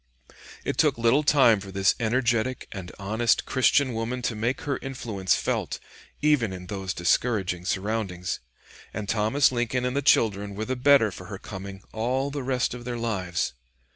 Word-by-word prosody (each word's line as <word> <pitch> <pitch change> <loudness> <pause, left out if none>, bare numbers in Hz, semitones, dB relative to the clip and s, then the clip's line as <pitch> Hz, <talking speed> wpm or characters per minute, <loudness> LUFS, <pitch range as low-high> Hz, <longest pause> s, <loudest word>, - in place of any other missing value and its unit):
It - - -2
took - - +3
little 115 +5 +4
time 135 -7 +5
for 100 0 -9
this 95 -1 +3
energetic 120 +1 0
and 95 -3 -7
honest 110 +4 +1
Christian 130 0 +3
woman 115 +3 -3
to 120 - -1
make 115 +5 -1
her 140 -2 -2
influence 115 -8 -1
felt, - - -2 0.4
even 145 -9 +3
in 90 -1 -7
those 95 0 -4
discouraging 90 -1 0
surroundings, 95 -2 -2 0.6
and 105 0 -4
Thomas 110 +7 +3
Lincoln 125 +1 -1
and 125 +1 -1
the 140 - +1
children 105 -7 +2
were 110 +2 -3
the 130 - -2
better 125 -4 +5
for - - -10
her - - -7
coming 95 0 -8
all 130 +5 -1
the 145 0 -3
rest 125 -2 0
of 125 -1 -8
their 120 0 -4
lives. 95 - -2
115 Hz, 170 wpm, -26 LUFS, 100-125 Hz, 0.6 s, time